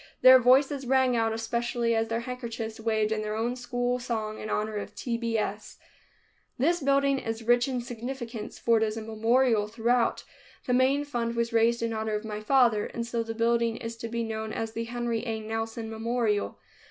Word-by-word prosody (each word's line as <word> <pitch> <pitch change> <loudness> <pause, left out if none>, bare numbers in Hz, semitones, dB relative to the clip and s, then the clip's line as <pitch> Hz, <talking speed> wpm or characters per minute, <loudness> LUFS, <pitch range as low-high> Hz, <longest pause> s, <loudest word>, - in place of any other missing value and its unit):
Their 255 0 +10
voices 265 +2 +3
rang 260 -1 +3
out 225 -1 +1
especially 235 +1 -1
as 225 0 +1
their 230 +1 -2
handkerchiefs 235 -3 -5
waved 220 -1 0
in 220 -1 0
their 215 0 -3
own 235 +3 -1
school 245 0 -1
song 220 -3 -3
in 215 - -6
honor 215 0 -1
of 205 0 -6
T. 235 +3 -2
B. 230 -1 -1
S. 210 0 -4 0.8
This 335 +7 +2
building 275 0 +2
is 225 -1 -4
rich 240 +2 +3
in 255 -2 -2
significance, 240 -2 -6
for 230 -1 +3
it 220 - +2
is 215 0 -1
a 225 - -4
memorial 225 0 +2
throughout. 230 +2 +1 0.4
The 250 - 0
main 265 +3 +3
fund 235 -4 -2
was 235 0 -1
raised 230 +1 +3
in 230 0 -1
honor 220 -1 -2
of 210 +1 -4
my 210 -1 -4
father, 230 -2 +3
and 235 - -4
so 235 0 -2
the 225 0 -5
building 230 0 +1
is 230 0 -6
to 230 - -5
be 235 0 -2
known 220 -1 -4
as 225 0 -3
the 230 +1 -4
Henry 235 -1 -2
A. 225 -2 -3
Nelson 225 +1 -4
Memorial. 225 -1 -1
230 Hz, 200 wpm, -28 LUFS, 220-245 Hz, 0.8 s, Their